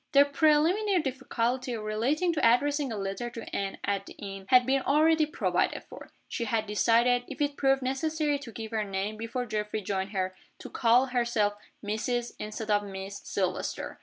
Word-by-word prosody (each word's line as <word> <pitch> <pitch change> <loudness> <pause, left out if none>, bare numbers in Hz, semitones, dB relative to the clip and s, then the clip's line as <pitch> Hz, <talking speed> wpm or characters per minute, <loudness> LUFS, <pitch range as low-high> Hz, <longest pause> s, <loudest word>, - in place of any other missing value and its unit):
The 280 0 +7
preliminary 320 +6 +3
difficulty, 255 -2 -2
relating 235 +11 0
to 315 - -1
addressing 275 +4 +3
a 220 - -3
letter 195 +5 -3
to 230 -1 -8
Anne 195 -1 -2
at 200 -1 -1
the - - -9
inn, 195 -1 -8
had 250 -1 +6
been 270 +1 +2
already 310 +3 +3
provided 310 - 0
for. - - -12 0.2
She 235 - -3
had 220 0 0
decided 235 +4 +3
if 275 - -8
it 290 -1 0
proved 270 -1 +2
necessary 295 +2 0
to 255 -5 -9
give 220 0 -7
her 220 -1 0
name, 200 +1 -3
before 230 +3 -3
Geoffrey 210 -1 -3
joined 190 0 -2
her 185 -2 -2 0.2
to - - -10
call 240 +2 +4
herself 235 -5 +1 0.3
Mrs., 235 +3 -2
instead 215 +1 -4
of 205 0 +4
Miss, 195 0 -7
Silvester. 185 -2 -3
235 Hz, 175 wpm, -28 LUFS, 210-275 Hz, 0.3 s, The